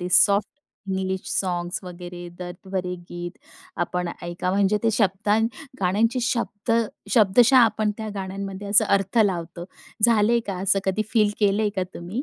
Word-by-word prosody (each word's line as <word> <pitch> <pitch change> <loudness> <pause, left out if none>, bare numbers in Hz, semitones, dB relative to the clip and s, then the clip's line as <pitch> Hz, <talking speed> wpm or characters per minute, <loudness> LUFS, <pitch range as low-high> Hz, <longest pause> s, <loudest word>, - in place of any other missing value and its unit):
ती 180 - -3
soft 200 +1 +5 0.4
English 190 0 -1
songs 175 0 -2
वगैरे, 175 0 -8
दर्द 180 +1 -8
भरे 180 -1 -2 0.2
गीत, 175 0 -5 0.5
आपण 180 -1 -3
ऐका 175 +1 -3
म्हणजे 200 +2 +2
ते 225 - +3
शब्दा 205 0 +2 0.4
गाण्यांचे 220 +7 +1
शब्द 235 -2 -1 0.4
शब्दशः 235 +4 +5
आपण 215 -3 +3
त्या 220 -1 -4
गाण्यांमध्ये 195 0 -5
असा 200 - +5
अर्थ 195 +3 0
लावतो. 175 -3 -2 0.4
झालंय 230 0 +4
का 195 -2 -3
असं 195 0 +3
कधी 190 +3 0
फील 210 -2 +4
केलंय 205 +1 +3
का 190 - +1
तुम्ही? 185 +9 -5
195 Hz, 145 wpm, -24 LUFS, 180-215 Hz, 0.5 s, soft